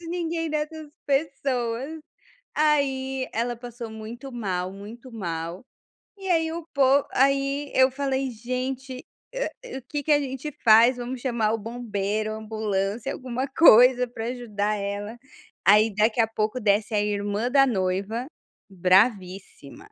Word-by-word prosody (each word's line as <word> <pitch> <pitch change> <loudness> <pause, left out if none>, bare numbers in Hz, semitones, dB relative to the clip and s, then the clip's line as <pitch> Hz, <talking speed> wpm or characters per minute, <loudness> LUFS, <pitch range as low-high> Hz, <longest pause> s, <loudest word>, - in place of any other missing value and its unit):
Ninguém 335 -1 -3
dessas 305 0 -4 0.2
pessoas, 275 -1 -1 0.6
aí 270 -3 +1
ela 240 +2 -1
passou 240 -1 -8
muito 230 +5 -8
mal, 185 -6 -3
muito 225 +5 -11
mal 170 -3 -5 0.6
e 385 -1 -7
aí 325 -2 +2
o 335 +1 -5
po 275 0 +4
aí 275 +1 +1
eu 260 0 +5
falei: 270 -1 -2
"Gente 255 +2 -5 0.3
a - - -5
o - - -12
que 290 -1 -3
que 305 - +3
a 290 - +5
gente 270 +2 -5
faz? 230 +2 +7
Vamos 245 +1 -5
chamar 235 -4 0
o - - -1
bombeiro, 215 -2 -3
ambulância, 215 +2 -2
alguma 255 +1 -4
coisa 250 -3 +6
pra 230 -1 -6
ajudar 215 -4 -2
ela", 205 +3 -5 0.5
aí 210 +2 +5
daqui 220 +3 +2
a 225 - +4
pouco 220 +2 -2
desce 210 +1 +1
a 210 - +3
irmã 205 +3 -1
da 275 +1 +5
noiva 200 +2 -1 0.4
"bravíssima." 185 - +1
240 Hz, 135 wpm, -25 LUFS, 215-270 Hz, 0.6 s, faz